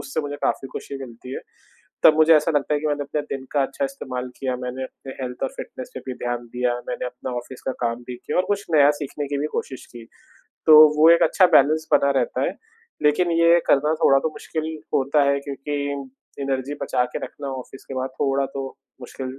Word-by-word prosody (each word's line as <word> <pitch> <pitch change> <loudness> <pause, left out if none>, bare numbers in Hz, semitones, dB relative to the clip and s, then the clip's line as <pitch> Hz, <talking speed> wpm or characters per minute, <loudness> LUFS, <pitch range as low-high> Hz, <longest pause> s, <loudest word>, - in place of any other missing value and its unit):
उससे 140 +3 -3
मुझे 145 -1 -5
काफ़ी 135 - -1
खुशी 140 - -6
मिलती 120 +1 -11
है, - - -5 0.6
तब 155 - +7
मुझे 160 +1 +6
ऐसा 150 - +2
लगता 145 +1 0
है 145 - 0
कि 155 - -2
मैंने 145 -1 -1
अपने 150 +2 -2 0.2
दिन 130 - -11
का 145 -2 +3
अच्छा 275 - -2
इस्तेमाल 130 - -5
किया, 130 -2 -2
मैंने 125 +1 -4
अपने 130 0 -10
हेल्थ 125 -1 -6
और 135 - +1
फिटनेस 130 - -8
पे - - -6
भी 130 - -3
ध्यान 120 0 -3
दिया, 125 -1 +1
मैंने - - -3
अपना 125 +1 -6
ऑफिस 125 +1 -10
का - - +1
काम 115 +1 -2
भी - - -4
किया - - -5
और 180 - +3
कुछ 200 0 0
नया 145 -1 +7
सीखने 145 0 -4
की 145 - -2
भी 150 - -1
कोशिश 130 - -5
की। 120 -1 -9 0.6
तो 155 - +9 0.2
वो 160 +2 +8
एक - - +2
अच्छा 185 +3 +5
बैलेंस 155 +2 +3
बना 140 - +4
रहता - - -2
है। - - -3 0.5
लेकिन 160 +4 +3
ये 170 +1 +6
करना 150 +3 +3
थोड़ा 135 0 +6
तो 160 - -1
मुश्किल 155 0 -5 0.3
होता 140 +2 +3
है 140 - +1
क्योंकि 140 +1 -5 0.7
एनर्जी 135 +1 -2
बचा 125 -1 +1
के - - -1
रखना 140 -1 -8
ऑफिस 135 - -13
के 135 - -8
बाद 130 0 -2
थोड़ा 135 0 +1
तो 135 -1 -3 0.3
मुश्किल 130 +1 -7
140 Hz, 215 wpm, -23 LUFS, 130-150 Hz, 0.7 s, तो